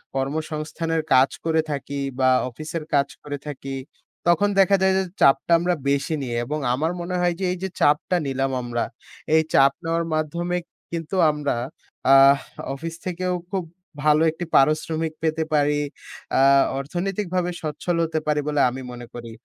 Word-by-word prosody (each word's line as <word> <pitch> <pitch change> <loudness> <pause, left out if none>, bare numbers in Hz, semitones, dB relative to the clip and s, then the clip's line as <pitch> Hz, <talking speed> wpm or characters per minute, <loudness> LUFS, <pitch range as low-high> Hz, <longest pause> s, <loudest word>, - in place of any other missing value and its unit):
কর্মসংস্থানের 155 +3 -2
কাজ 130 +1 +6 0.2
করে 160 -1 +3
থাকি 140 0 -4 0.2
বা 130 0 +4 0.2
অফিসের 155 +5 -6
কাজ 140 -1 +3 0.2
করে 145 -1 -4
থাকি, 135 -1 -6 0.5
তখন 175 +4 +4
দেখা 195 +1 +5
যায় 190 0 +4
যে, 190 - +2 0.2
চাপটা 135 - +4
আমরা 175 +1 +1
বেশি 140 +3 0
নিই। 125 -3 -4
এবং 150 +5 -3
আমার 155 +6 0
মনে 180 +1 -3
হয় 175 -1 +2
যে, 190 - -1
এই 180 - -3
যে, 190 - -1
চাপটা 150 +5 +3
নিলাম 135 0 -1
আমরা, 120 -1 -2 0.5
এই 160 - +6
চাপ 135 0 +6
নেওয়ার 165 +1 0
মাধ্যমে 170 +3 -1 0.3
কিন্তু 165 +2 -4 0.2
আমরা 150 -3 -2 0.6
আহ 135 +1 +8 0.4
অফিস 165 +4 -6
থেকেও 180 0 -2 0.2
খুব 190 -2 -1 0.4
ভালো 150 0 +4
একটি 170 +2 -6
পারিশ্রমিক 155 +2 +2
পেতে 160 0 +1
পারি, 145 0 +3 0.6
আ - - +4 0.4
অর্থনৈতিকভাবে 180 +4 -2
সচ্ছল 160 +3 -2
হতে 160 -1 -1
পারি 150 -1 +2
বলে 150 -1 +1
আমি 130 +2 -6
মনে 120 0 -8
করি। 120 -1 -8
155 Hz, 155 wpm, -23 LUFS, 140-170 Hz, 0.6 s, আহ